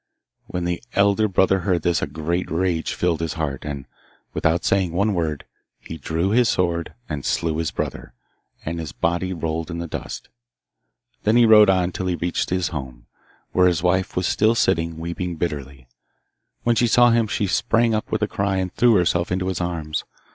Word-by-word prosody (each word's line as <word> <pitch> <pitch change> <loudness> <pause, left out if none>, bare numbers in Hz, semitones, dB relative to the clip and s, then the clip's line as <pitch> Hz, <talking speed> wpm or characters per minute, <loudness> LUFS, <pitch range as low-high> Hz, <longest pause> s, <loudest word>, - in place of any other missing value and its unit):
When 90 - -3
the 85 +2 -2
elder 100 +2 +3
brother 95 0 +3
heard 90 -3 0
this 85 -1 +1
a - - -1
great 85 +3 -2
rage 85 -1 -1
filled 85 -3 0
his 80 -2 -2
heart, 75 -5 -3
and, 70 -3 -5 0.5
without 80 +2 +1
saying 95 -4 +1
one 100 +4 +1
word, 80 -5 -2 0.3
he 80 - -9
drew 85 +6 -1
his 120 0 +4
sword 85 -2 -1
and 75 -3 -4
slew 80 -2 0
his 80 -1 -1
brother, - - -5 0.5
and 85 +1 -3
his 80 -4 -6
body 85 +2 -1
rolled 80 -2 -3
in 85 - -4
the 85 - -4
dust. 85 - -6 0.9
Then 110 +2 +2
he 120 -1 +6
rode 105 -2 +7
on 95 -1 +2
till 95 +1 -4
he 90 - 0
reached 85 0 -2
his 90 -1 0
home, 65 -5 -7 0.5
where 90 0 +4
his 90 -2 +1
wife 95 +1 +1
was 90 - 0
still 110 +5 +2
sitting, 85 -6 +1
weeping 85 +1 -4
bitterly. 70 -6 -5 0.8
When 120 -1 +2
she 120 +2 +3
saw 120 +1 +5
him 115 -1 +2
she 105 - -1
sprang 115 +4 +2
up 110 - -2
with - - 0
a - - +2
cry, 100 0 -1
and 95 -1 -2
threw 120 -2 +4
herself 90 -1 +1
into 95 +1 0
his 90 -2 -2
arms. 80 -3 -3
90 Hz, 190 wpm, -22 LUFS, 80-95 Hz, 0.9 s, rode